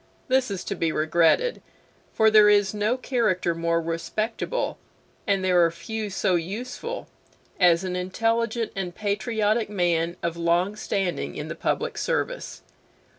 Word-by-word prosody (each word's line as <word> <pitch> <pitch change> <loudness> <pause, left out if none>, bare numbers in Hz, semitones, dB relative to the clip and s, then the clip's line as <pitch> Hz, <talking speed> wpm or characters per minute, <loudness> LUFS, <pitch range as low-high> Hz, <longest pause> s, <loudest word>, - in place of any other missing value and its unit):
This 260 -1 +2
is 195 -3 -4
to - - -3
be 165 -4 0
regretted, 170 - +2 0.5
for 220 0 +4
there 215 -1 +7
is 205 -1 +3
no 210 +4 0
character 220 -10 0
more 165 0 0
respectable, 215 - -3 0.5
and 195 -2 +1
there 180 -2 +4
are 165 - +4
few 210 +6 -5
so 190 -1 0
useful, 240 - -4 0.5
as 175 -1 +5
an 185 -1 -3
intelligent 225 +5 -1
and 180 -3 -4
patriotic 215 +1 0
man 175 -3 0
of 170 -1 -1
long 170 +4 +1
standing 195 -4 -2
in - - -5
the - - -4
public - - -2
service. - - -2
195 Hz, 140 wpm, -25 LUFS, 170-220 Hz, 0.5 s, there